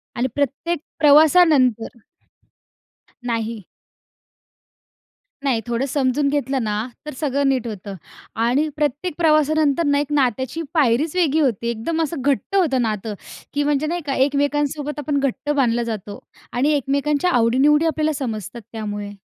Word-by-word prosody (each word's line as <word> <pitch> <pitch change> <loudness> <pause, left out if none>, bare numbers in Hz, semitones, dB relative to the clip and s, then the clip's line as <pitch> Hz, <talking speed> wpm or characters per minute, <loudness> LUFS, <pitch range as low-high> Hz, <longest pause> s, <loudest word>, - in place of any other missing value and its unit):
आणि 245 +2 0
प्रत्येक 285 +4 -1 0.2
प्रवासानंतर 295 -6 +4 1.3
नाही. 230 -2 -3 1.8
नाही, 255 -5 +1
थोडं 240 +2 -1
समजून 280 +1 +1
घेतलं 275 -3 -1
ना, 210 -1 -1 0.3
तर 300 - -6
सगळं 280 -2 0
नीट 255 -3 0
होतं 200 -2 -7 0.5
आणि 265 +6 +2
प्रत्येक 295 +4 -1
प्रवासानंतर 310 -2 +3
ना, 285 0 +2
एक 290 0 -3
नात्याची 260 +2 0
पायरीच 295 +1 +2
वेगळी 320 -4 +2
होती. 235 -6 0
एकदम 235 +9 -2
असं 315 -2 -4
घट्ट 280 - -1
होतं 295 -10 +2
नातं, 215 -1 -2 0.4
की 290 0 0
म्हणजे 295 +1 0
नाही 345 +2 -2
का 275 -2 -1
एकमेकांसोबत 290 +2 0
आपण 285 0 -1
घट्ट 275 +1 -2
बांधलं 240 -5 +1
जातो 210 -3 -6 0.3
आणि 275 +5 +2
एकमेकांच्या 285 +4 0
आवडी-निवडी 270 +6 +3
आपल्याला 310 -1 0
समजतात 235 - -5
त्यामुळे. 205 -2 -5
280 Hz, 130 wpm, -21 LUFS, 235-300 Hz, 1.8 s, प्रवासानंतर